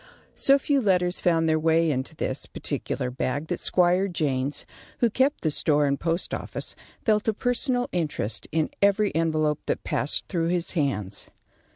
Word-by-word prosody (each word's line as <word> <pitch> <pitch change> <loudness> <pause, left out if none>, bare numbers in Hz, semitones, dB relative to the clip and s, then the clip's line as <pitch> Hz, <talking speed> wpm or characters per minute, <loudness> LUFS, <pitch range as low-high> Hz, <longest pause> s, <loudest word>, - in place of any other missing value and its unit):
So 275 0 +5
few 280 0 +1
letters 180 -4 +2
found 165 -2 +2
their 155 0 +2
way 165 0 +3
into 130 +3 -3
this, - - -3
particular 125 0 -3
bag 140 +4 -2
that - - -2
Squire 180 +2 +3
Jaynes, 145 -6 -1 0.3
who 235 -2 +2
kept 265 +6 +1
the 155 - +1
store 150 0 +2
and 140 -1 0
post 170 +1 -2
office, - - -5 0.3
felt 215 -1 +2
a 220 - +2
personal 245 +1 0
interest 150 - -2
in 155 0 0
every 200 +1 +3
envelope 155 -2 +1
that - - -1
passed - - -1
through 165 -2 -1
his 175 0 0
hands. 120 - -2
165 Hz, 165 wpm, -25 LUFS, 150-200 Hz, 0.3 s, So